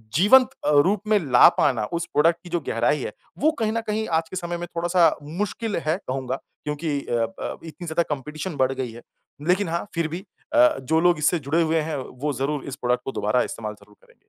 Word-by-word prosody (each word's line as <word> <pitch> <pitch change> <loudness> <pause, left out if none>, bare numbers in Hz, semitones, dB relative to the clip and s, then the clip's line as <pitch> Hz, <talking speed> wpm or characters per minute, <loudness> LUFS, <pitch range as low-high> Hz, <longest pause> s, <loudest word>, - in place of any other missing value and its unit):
जीवंत 250 - +6 0.2
अ, - - +3
रूप 195 +5 +1
में 215 0 +4
ला - - +9
पाना 115 -5 +2
उस 170 0 -1
प्रोडक्ट 165 +3 +4
की 175 - -11
जो 175 0 0
गहराई 135 +5 +1
है - - -4 0.3
वो 310 +3 +4
कहीं 220 -1 +1
न 230 +1 -1
कहीं 215 +1 -1
आज 160 0 -9
के - - -7
समय 175 -1 -3
में 175 0 -5
थोड़ा-सा 170 -1 +3
मुश्किल 205 +7 -3
है 155 +3 +1
कहूँगा 130 0 -2 0.3
क्योंकि 150 0 -2
अ - - -5 0.3
अ, - - -4
इतनी 165 +2 -9
ज़्यादा 165 +2 +1
कॉम्पिटिशन 150 +4 -4
बढ़ 130 0 +2
गयी 130 -3 -4
है। 120 +1 -11 0.5
लेकिन 185 +1 +2
हाँ 170 +1 -1
फ़िर 165 -2 0
भी 170 +4 -6 0.3
अ, 125 - +6
जो 160 +5 +1
लोग 175 +1 +4
इससे 155 +3 +2
जुड़े 150 +4 +1
हुए 165 0 +2
हैं 155 0 -3
वो 135 +2 -4
ज़रूर 135 +2 -2
इस 140 - -5
प्रोडक्ट 125 -2 0
को - - -3
दोबारा 105 +1 +1
इस्तेमाल 105 -2 -5
ज़रूर 105 0 -20
करेंगे। - - -24
160 Hz, 225 wpm, -24 LUFS, 135-175 Hz, 0.5 s, ला